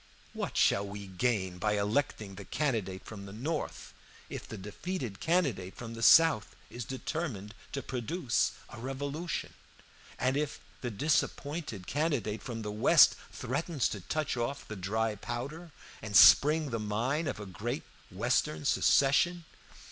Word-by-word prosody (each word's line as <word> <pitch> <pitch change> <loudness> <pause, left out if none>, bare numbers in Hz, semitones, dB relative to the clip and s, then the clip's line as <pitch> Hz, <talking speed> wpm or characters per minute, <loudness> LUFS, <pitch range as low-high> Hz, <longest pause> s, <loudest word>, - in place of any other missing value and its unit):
What - - -4
shall 100 - +4
we 100 0 -7
gain 95 -2 -1
by 105 +1 +1
electing 105 0 -1
the 100 +1 -8
candidate 110 -7 -2
from 100 -2 -8
the - - -9
North, 145 +9 -4 0.4
if - - -6
the 110 - -7
defeated 105 - -5
candidate 135 - 0
from 115 -1 -7
the 115 - -7
South 160 +1 +6 0.2
is 120 -1 -6
determined 130 - -4 0.2
to 140 - -3
produce 130 +1 0 0.2
a 120 - -10
revolution; 140 +6 -4 0.6
and 130 +1 +1
if 150 0 -2 0.2
the 125 - -2
disappointed 145 - -1
candidate 135 - -1
from 115 -3 -5
the 105 - -3
West 105 +1 +6 0.2
threatens 140 +2 -1
to 100 - -5
touch 155 - -2
off 125 +4 -3
the 110 - -6
dry 110 +4 -1
powder 140 - -6 0.3
and 105 -1 -5
spring 150 +4 +7
the 115 - -1
mine 120 +9 -1
of 130 - -3
a 105 - -6
great 120 +8 -4 0.3
western 75 -1 0
secession? 160 - +3
120 Hz, 145 wpm, -31 LUFS, 105-145 Hz, 0.6 s, spring